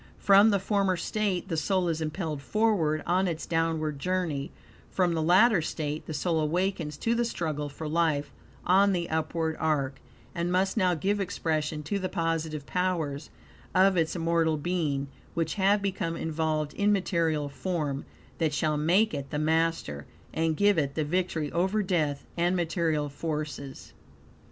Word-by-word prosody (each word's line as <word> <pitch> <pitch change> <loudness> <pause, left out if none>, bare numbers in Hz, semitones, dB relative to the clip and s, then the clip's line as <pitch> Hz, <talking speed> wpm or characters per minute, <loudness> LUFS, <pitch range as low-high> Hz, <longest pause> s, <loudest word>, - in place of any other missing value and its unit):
From 200 +2 +6
the 200 - +3
former 195 -1 +1
state 195 0 -1
the 170 - -2
soul 185 +3 +1
is 165 -1 -1
impelled 155 -2 -3
forward 180 -6 +1
on 185 +2 +2
its 165 -2 -3
downward 160 -3 -1
journey; 170 -5 -1 0.4
from 180 -2 +1
the 160 - 0
latter 185 +4 +5
state 155 -1 -4
the 160 - -4
soul 165 +2 0
awakens 160 -1 -1
to 230 - 0
the 235 0 +1
struggle 155 -9 -3
for 155 +2 -7
life 155 -2 0 0.3
on 195 +2 +5
the 170 -2 -1
upward 160 0 -1
are; 145 -4 0 0.4
and 170 0 -1
must 190 +1 +1
now 185 -5 +2
give 200 +6 0
expression 155 -5 -2
to 200 +7 -2
the 185 -1 -2
positive 165 -4 -2
powers 165 -6 -1 0.5
of 190 +1 +5
its 165 -1 +1
immortal 165 -2 +1
being, 150 -4 -1 0.3
which 165 -1 0
have 200 +1 +2
become 185 -4 -2
involved 155 -1 -1
in 205 0 +2
material 165 -6 +1
form; 140 0 -3 0.4
that 155 -3 +1
shall 155 -1 +1
make 185 +9 +3
it 140 -1 -4
the 150 - -3
master, 160 - 0 0.3
and 160 -1 0
give 205 -3 +4
it 140 -1 -1
the 155 - 0
victory 160 -2 -1
over 190 +5 +1
death 155 -7 0
and 175 +2 +1
material 165 -3 0
forces. 150 -2 -5
165 Hz, 160 wpm, -28 LUFS, 155-185 Hz, 0.5 s, From